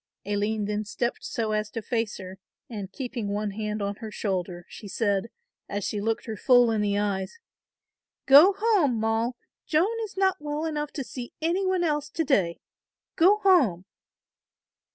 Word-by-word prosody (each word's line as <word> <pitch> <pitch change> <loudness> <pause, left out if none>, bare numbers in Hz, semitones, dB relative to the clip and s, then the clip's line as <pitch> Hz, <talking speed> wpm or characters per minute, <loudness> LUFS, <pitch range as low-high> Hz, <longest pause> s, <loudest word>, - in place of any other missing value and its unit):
Aline 205 +1 -1
then 210 +1 -2
stepped 240 +3 -3
so 220 -2 -2
as 215 0 -1
to 230 - -5
face 225 -3 -2
her, 190 0 -9 0.3
and 205 -4 -6
keeping 245 -4 -4
one 205 +1 -2
hand 210 0 -3
on 200 0 -3
her 220 - -7
shoulder, 180 -4 -3
she 210 - -10
said, 205 +1 0 0.4
as 205 0 -3
she 205 +2 -2
looked 225 +1 -1
her 220 - -4
full 245 +2 +5
in 220 -2 +1
the 205 -1 +1
eyes, 200 - -2 0.9
"go 295 +9 +8
home, 390 - +2
Moll, 225 +2 0 0.3
Joan 355 +9 +2
is 415 -3 -8
not 380 -1 +2
well 295 +1 -3
enough 300 -2 -3
to 280 - -3
see 245 -1 -8
any 350 +4 0
one 370 -1 +1
else 300 -2 0
to 325 +2 -1
day, 195 - +1 0.6
go 380 +5 +5
home." 260 - +4
225 Hz, 170 wpm, -26 LUFS, 205-295 Hz, 0.9 s, go